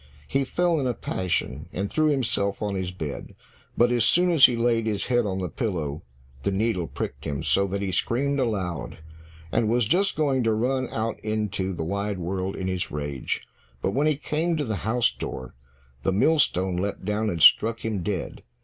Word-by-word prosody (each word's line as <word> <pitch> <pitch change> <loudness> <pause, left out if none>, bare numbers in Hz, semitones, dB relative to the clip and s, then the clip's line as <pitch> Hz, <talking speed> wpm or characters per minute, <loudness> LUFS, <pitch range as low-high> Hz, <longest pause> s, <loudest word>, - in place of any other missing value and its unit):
He 135 0 +1
fell 175 +3 +1
in 135 - 0
a 125 - -1
passion, 85 -4 -2
and 100 +2 -2
threw 155 +8 +1
himself 110 -9 0
on 105 -1 -1
his 95 -2 -2
bed, 80 -6 -6 0.4
but 120 +1 +4
as 120 -2 +3
soon 175 +7 +4
as 160 -5 +8
he 125 - -1
laid 115 -1 +1
his 105 -2 -1
head 120 -3 +2
on 95 -1 -2
the 95 -1 -2
pillow, 80 - -3 0.4
the 70 - 0
needle 95 -4 0
pricked 70 +3 -5
him, 70 -3 -3
so 100 0 +3
that 100 +1 -2
he 95 - -1
screamed 140 +8 0
aloud, 95 - -2 0.5
and 110 - +1
was 120 0 +2
just 195 - +2
going 140 -4 +1
to 115 -2 +2
run 130 +3 0
out 110 0 -2
into 105 -3 -2
the 85 - -4
wide 100 +4 -2
world 95 +2 -3
in 95 - -4
his 95 -1 -2
rage, 70 -3 -4 0.3
but 95 - -1
when 145 +5 +2
he 155 - +3
came 160 +4 -1
to 150 - -1
the 110 -4 -2
house 110 +6 +1
door, 65 0 -6 0.5
the 95 - +1
millstone 95 - +2
leapt 100 0 -3
down 105 +1 0
and 85 -5 -1
struck 115 +1 +6
him 105 -4 -1
dead. 95 -1 -3
105 Hz, 195 wpm, -25 LUFS, 95-125 Hz, 0.5 s, as